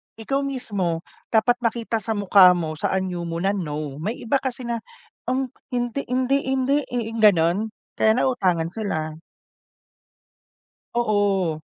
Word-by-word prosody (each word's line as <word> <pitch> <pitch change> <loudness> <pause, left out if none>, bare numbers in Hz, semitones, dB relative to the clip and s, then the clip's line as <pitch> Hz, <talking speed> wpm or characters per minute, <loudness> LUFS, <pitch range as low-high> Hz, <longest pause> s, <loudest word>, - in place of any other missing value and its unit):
Ikaw 230 +5 -1
mismo, 205 -12 -2 0.2
dapat 240 +2 +2
makita 230 -1 -1
sa 220 0 -3
mukha 195 -2 +6
mo, 155 -3 -3
sa - - 0
anyo 180 -2 -2
mo 165 +1 -3
na, 195 - +3
no. 150 -7 -4
May 210 +9 -4
iba 270 +4 +2
kasi 260 -1 -4
na, 235 -1 -2 0.5
um, 260 0 -1 0.2
hindi, 245 +2 -2
hindi, 260 +2 +1
hindi, 265 +2 +2
eh, 235 -2 -3
ganun, 195 0 +4 0.3
kaya 220 0 +5
nauutangan 185 -10 +1
sila. 160 -7 -3 1.7
Oo. 205 -8 +1
215 Hz, 135 wpm, -23 LUFS, 175-245 Hz, 1.7 s, mukha